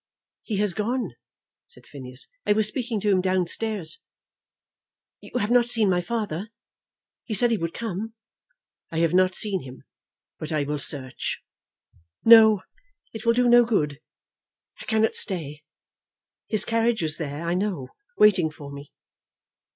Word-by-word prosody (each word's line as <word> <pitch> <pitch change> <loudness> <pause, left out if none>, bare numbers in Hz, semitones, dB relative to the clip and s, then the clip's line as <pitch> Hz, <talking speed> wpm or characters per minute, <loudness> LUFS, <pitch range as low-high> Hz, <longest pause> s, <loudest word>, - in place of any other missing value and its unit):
"He 215 - -4
has 205 -2 +1
gone," 225 - -2 0.6
said - - -20
Phineas. 130 -2 -11 0.2
"I - - +5
was 215 0 +2
speaking 230 -1 -3
to 210 0 +1
him 185 -2 +3
downstairs." 185 -1 -2 1.2
"You - - -6
have 215 -1 -1
not 245 -1 +4
seen 225 -5 +1
my 180 -1 +1
father? 205 -1 -4 0.7
He 220 - -3
said 240 +4 +2
he 225 - +2
would 165 -2 -4
come." 220 0 -5 0.8
"I 165 - -4
have 165 0 +2
not 185 0 +3
seen 200 -4 -2
him, 130 -1 -12 0.6
but 155 +1 -6
I 155 -2 0
will 145 +1 -3
search." 130 -2 0 0.8
"No; 220 -3 +8 0.5
it 225 +1 -7
will 230 - +5
do 245 +1 +2
no 240 0 +7
good. 150 -11 -1 0.8
I - - -9
cannot 220 0 +1
stay. 150 -6 0 0.9
His 215 -2 +2
carriage 230 -3 +1
is 155 -1 +1
there, 150 0 -5
I 170 - 0
know, 180 -8 -2 0.3
waiting 195 -6 +5
for 145 -2 -11
me." 140 0 -10
195 Hz, 150 wpm, -24 LUFS, 155-225 Hz, 1.2 s, No